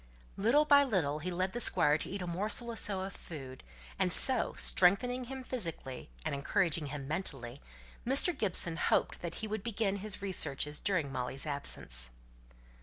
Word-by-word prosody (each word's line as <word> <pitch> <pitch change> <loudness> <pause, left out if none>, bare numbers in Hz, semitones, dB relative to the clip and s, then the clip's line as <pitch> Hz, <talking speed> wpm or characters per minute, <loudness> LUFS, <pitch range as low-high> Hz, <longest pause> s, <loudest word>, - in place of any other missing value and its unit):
Little 240 +10 +3
by 285 -1 +6
little 170 - 0
he 180 - -4
led 185 +1 -2
the 240 - -3
Squire 150 -9 +4
to - - -4
eat 195 0 -4
a - - -4
morsel 210 +7 0
or - - -6
so 200 -3 -3
of 190 0 -5
food; 135 -5 -9 0.4
and - - +2
so, - - +4
strengthening 245 - +3
him 265 +1 -7
physically, 165 - -2 0.2
and - - -1
encouraging 155 +2 +1
him 140 -1 -6
mentally, 140 -6 -4 0.4
Mr. 275 +7 +3
Gibson 180 -7 +1
hoped - - +1
that 170 -1 -5
he - - -5
would 215 -1 -3
begin 210 -2 -1
his 205 0 -4
researches 150 -6 -1
during 180 -9 0
Molly's 130 +2 -1
absence. 60 - -1
185 Hz, 170 wpm, -32 LUFS, 145-220 Hz, 0.4 s, by